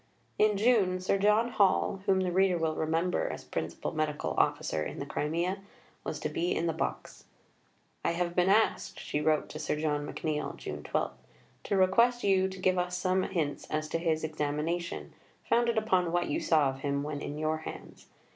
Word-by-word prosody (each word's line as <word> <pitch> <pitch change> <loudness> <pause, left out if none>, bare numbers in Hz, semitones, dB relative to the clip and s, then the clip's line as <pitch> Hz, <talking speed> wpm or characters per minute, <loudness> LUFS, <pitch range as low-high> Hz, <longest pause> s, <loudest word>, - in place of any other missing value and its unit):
In 210 -1 +4
June, 200 -5 +3
Sir 190 +2 +1
John 210 +4 +3
Hall, 200 -3 +2
whom 190 -1 +4
the 185 -1 0
reader 185 0 +3
will 160 -1 0
remember 165 +3 0
as - - -6
Principal 80 0 -4
Medical 150 - -1
Officer 80 - +1
in - - -4
the 140 - -4
Crimea, 170 +6 -1 0.4
was - - -4
to - - 0
be 175 +2 -1
in 170 - 0
the 165 - +1
box. 160 - -4 0.8
"I - - +1
have 175 0 -2
been 180 +1 +3
asked," 220 +3 +2
she 150 - -2
wrote 155 0 +2
to 155 - -7
Sir 155 - -1
John 150 -1 -1
McNeill 150 -2 -3
(June - - -6
12), - - -1 0.5
"to 200 - +1
request 235 +6 +4
you 190 -1 +3
to 190 - -8
give 185 0 +2
us 180 0 -1
some 185 0 +1
hints 160 -7 -2
as 155 0 -1
to 165 - -1
his 160 -2 0
examination, 155 +3 -2 0.3
founded 235 -1 +2
upon 185 -6 +2
what 175 0 0
you - - 0
saw 155 -4 +3
of 135 0 -6
him 140 0 -1
when 145 -1 -4
in 145 - -5
your 155 +1 0
hands. 155 - -9
175 Hz, 190 wpm, -30 LUFS, 155-190 Hz, 0.8 s, In